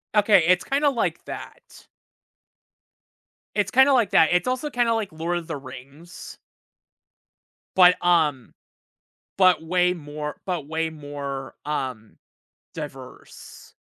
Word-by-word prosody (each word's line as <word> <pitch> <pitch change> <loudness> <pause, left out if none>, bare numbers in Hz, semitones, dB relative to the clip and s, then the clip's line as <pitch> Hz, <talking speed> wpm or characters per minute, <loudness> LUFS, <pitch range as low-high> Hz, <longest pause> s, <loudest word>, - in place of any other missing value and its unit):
Okay, 205 -4 +5
it's 180 0 +3
kinda 285 +2 +1
like 245 -5 -2
that. - - -11 1.7
It's 205 0 0
kinda 265 +3 +5
like 235 -7 +2
that. 160 - +5
It's 180 +4 +1
also 255 +4 -2
kinda, 240 -4 +1
like, 220 -3 -2
Lord 165 +2 -3
of 165 - -7
the 160 - -4
Rings. 140 +5 -12 1.4
But, 180 -1 +5
um, 155 -8 +1 0.8
but 185 -3 +4
way 180 +2 +1
more 150 -2 -7
but 175 -6 -3
way 160 +1 -2
more, 145 -3 -7
um, 130 -7 -5 0.6
diverse. 135 -5 -11
170 Hz, 115 wpm, -23 LUFS, 145-195 Hz, 1.7 s, Okay